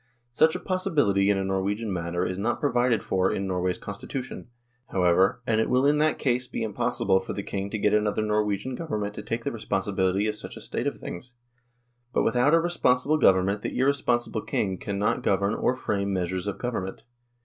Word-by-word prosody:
Such 160 +6 +4
a - - -2
possibility 145 - +1
in 100 - +3
a 95 - -1
Norwegian 100 +3 -1
matter 85 0 -2
is 90 +1 -3
not 120 +4 0
provided 120 -5 +2
for 95 0 +1
in 100 - -2
Norway's 90 -1 -1
Constitution, 125 +7 -6 0.4
however, 95 +5 +2
and 110 -1 +2
it - - -1
will 130 +2 +3
in 145 +1 +4
that 155 +1 +2
case 125 -2 0
be - - -4
impossible 100 -2 +1
for 95 - -6
the 100 - -4
King 100 0 -4
to 110 - -3
get 105 0 +2
another 105 0 +1
Norwegian 105 +3 0
Government 105 -9 -3
to - - -6
take 115 0 -4
the - - -2
responsibility 95 -2 0
of 105 0 -1
such 105 - -7
a - - -9
state - - -3
of - - -2
things. 125 +8 -8 0.8
But - - +2
with 115 - +1
out 135 +6 +4
a - - +5
responsible 155 -4 +2
Government 95 0 +3
the - - -4
irresponsible 125 -4 +1
King 95 -3 -2
cannot 100 0 -1
govern 100 +2 +1
or 125 +2 +1
frame 100 -5 -2
measures 90 0 -2
of 100 - -3
government. 105 -6 -4
105 Hz, 195 wpm, -26 LUFS, 95-125 Hz, 0.8 s, a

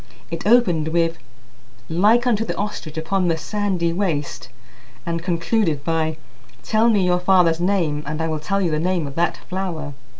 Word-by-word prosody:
It 165 +3 -4
opened 185 -10 +4
with: 165 0 0 0.7
"Like 210 +9 +3
unto 225 -3 +2
the - - -4
ostrich 170 -7 -4
upon 180 +3 0
the 165 -1 +1
sandy 185 -2 -1
waste" 165 -9 -2 0.6
and 170 0 -2
concluded 170 -2 0
by: 160 0 -1 0.5
"Tell 220 +1 +3
me 205 -5 +3
your 180 0 +2
father's 180 -3 +3
name, 175 -5 0
and 155 +1 -3
I 160 - 0
will 155 -1 -2
tell 195 +6 -1
you 170 - 0
the 155 - 0
name 175 -1 0
of 140 - -6
that 170 +4 0
flower." 175 -6 -4
170 Hz, 170 wpm, -21 LUFS, 160-195 Hz, 0.7 s, opened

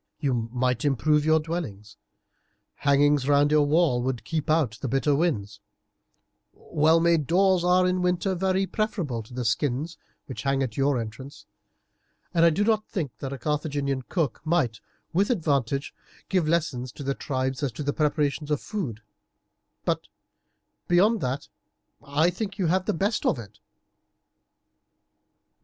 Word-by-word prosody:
You 125 -6 -1
might 125 -1 0
improve 150 +2 +2
your 160 0 +4
dwellings, 145 - -5 0.8
hangings 145 -1 +3
round 145 +1 +4
your 150 -1 +4
walls 150 -6 +2
would 125 -3 -2
keep 155 +5 -3
out 145 -9 +1
the 135 - -2
bitter 135 +3 +1
winds, 135 - -1 0.9
well 160 +2 +2
made 165 -4 +2
doors 185 0 +3
are 180 +1 +4
in 180 0 +1
winter 180 +2 +1
very 190 +1 +1
preferable 185 - -2
to 110 - -16
the 125 0 -4
skins 145 +7 -1 0.3
which 130 - -7
hang 135 -1 +1
at 120 -4 -4
your 140 -1 +2
entrance, 115 +5 -8 0.9
and 165 - +3
I 170 - +7
do 205 +7 +3
think 155 -10 -3
that 135 - -5
a 140 - -4
Carthaginian 145 -1 -1
cook 150 -1 -2
might, 155 -10 0 0.3
with 195 +4 +2
advantage, 140 - 0 0.4
give 180 -5 +1
lessons 140 -7 -1
to 140 - -8
the 140 0 0
tribes 130 -1 -2
as 140 -3 0
to 145 -1 -2
preparations 150 -1 0
of 150 -2 +1
food; 125 - -5 0.8
but - - -1 0.8
beyond 205 +5 +3
that 130 +1 -3 0.6
I 150 +4 +2
think 195 +2 -4
that - - -19
you 185 - +1
have 185 +3 +1
the - - 0
best 200 +6 0
of - - +2
it." 105 -3 -11
145 Hz, 150 wpm, -26 LUFS, 130-170 Hz, 0.9 s, I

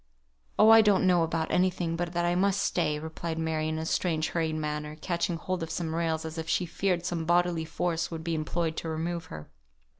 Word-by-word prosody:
"Oh! 220 - +7
I 225 0 +9
don't 205 -3 +3
know 180 -2 +4
about 165 0 -1
any 185 +1 +4
thing 175 -2 -3
but 170 0 -2
that 175 0 0
I 175 - +2
must 195 +2 +2
stay," 155 -6 0
replied 160 +1 -5
Mary, 160 -1 -1
in 160 0 -2
a 160 - -3
strange 160 -2 0
hurried 160 -2 -1
manner, 150 0 -3
catching 170 0 -1
hold 185 +1 -3
of 165 - -4
some 165 -2 -3
rails 160 -1 -1
as 160 +1 -5
if 160 0 -5
she 180 - +1
feared 175 0 -1
some 170 -2 -2
bodily 175 -1 +2
force 170 +1 -1
would 160 -1 -6
be 170 0 -2
employed 160 +1 -1
to 165 - -3
remove 165 +1 -3
her. 75 - -10
165 Hz, 220 wpm, -28 LUFS, 160-175 Hz, -, I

